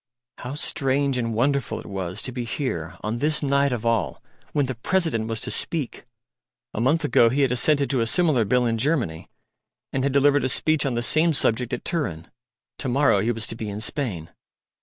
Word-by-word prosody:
How 125 Hz, +3 st, -6 dB
strange 140 Hz, -3 st, 0 dB
and 115 Hz, -2 st, -2 dB
wonderful 135 Hz, +2 st, 0 dB
it -, -, -11 dB
was 95 Hz, 0 st, -4 dB
to 130 Hz, -, -1 dB
be 125 Hz, -1 st, -4 dB
here 110 Hz, -, -4 dB
on 110 Hz, +3 st, -3 dB
this 150 Hz, +2 st, 0 dB
night 140 Hz, 0 st, +2 dB
of 120 Hz, -2 st, -3 dB
all, 115 Hz, -5 st, 0 dB, 0.3 s
when 145 Hz, -2 st, +1 dB
the 130 Hz, -, -3 dB
President 120 Hz, -3 st, 0 dB
was 115 Hz, -1 st, -2 dB
to -, -, -4 dB
speak! 155 Hz, -7 st, -4 dB, 0.7 s
A 110 Hz, -, -2 dB
month 150 Hz, +5 st, +2 dB
ago 120 Hz, -5 st, +4 dB
he 135 Hz, +4 st, 0 dB
had 130 Hz, -, +2 dB
assented 140 Hz, +3 st, +2 dB
to 130 Hz, -4 st, +1 dB
a 115 Hz, -, +1 dB
similar 155 Hz, -4 st, +3 dB
Bill 125 Hz, +4 st, +2 dB
in 115 Hz, -1 st, 0 dB
Germany, 115 Hz, -, -1 dB, 0.6 s
and 130 Hz, -, 0 dB
had 140 Hz, -, +1 dB
delivered 140 Hz, +1 st, +3 dB
a 130 Hz, -, +1 dB
speech 155 Hz, +1 st, +1 dB
on 125 Hz, -, -1 dB
the 120 Hz, -, -1 dB
same 155 Hz, +6 st, +5 dB
subject 120 Hz, -2 st, +1 dB
at 120 Hz, -, -4 dB
Turin. 90 Hz, -, -3 dB, 0.5 s
To 135 Hz, -, -2 dB
morrow 125 Hz, -5 st, +3 dB
he 115 Hz, +4 st, +1 dB
was 115 Hz, -1 st, -2 dB
to 115 Hz, -, -2 dB
be 110 Hz, -2 st, -5 dB
in 100 Hz, +1 st, -5 dB
Spain. 110 Hz, -, -3 dB
125 Hz, 205 wpm, -24 LUFS, 115-145 Hz, 0.7 s, same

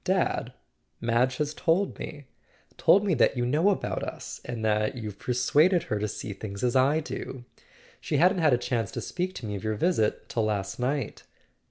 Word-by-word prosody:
Dad—Madge 120 Hz, +2 st, -1 dB
has 150 Hz, 0 st, -1 dB
told 180 Hz, +4 st, +1 dB
me. 145 Hz, -2 st, -7 dB, 0.5 s
Told 200 Hz, +2 st, +5 dB
me 190 Hz, -, +2 dB
that 140 Hz, -, +3 dB
you 120 Hz, -, +1 dB
know 150 Hz, +10 st, +3 dB
about 200 Hz, -, -1 dB
us -, -, -6 dB
and 120 Hz, -2 st, -4 dB
that 105 Hz, +3 st, +1 dB
you've 105 Hz, -4 st, -6 dB
persuaded 150 Hz, +8 st, +3 dB
her 105 Hz, -11 st, -2 dB
to 105 Hz, -, -1 dB
see 105 Hz, 0 st, -5 dB
things 100 Hz, +1 st, -7 dB
as 125 Hz, 0 st, +1 dB
I 140 Hz, +5 st, +4 dB
do. 130 Hz, -4 st, -6 dB, 0.5 s
She -, -, -1 dB
hadn't 185 Hz, +2 st, +4 dB
had 155 Hz, -3 st, +4 dB
a 125 Hz, -, +4 dB
chance 115 Hz, -4 st, -1 dB
to -, -, -3 dB
speak 185 Hz, +1 st, -3 dB
to -, -, -6 dB
me 105 Hz, -, -4 dB
of 100 Hz, -, -6 dB
your 110 Hz, 0 st, -1 dB
visit 110 Hz, -, +1 dB
till 115 Hz, -2 st, 0 dB
last 100 Hz, -1 st, -2 dB
night." 130 Hz, -1 st, -2 dB
125 Hz, 190 wpm, -27 LUFS, 110-160 Hz, 0.5 s, Told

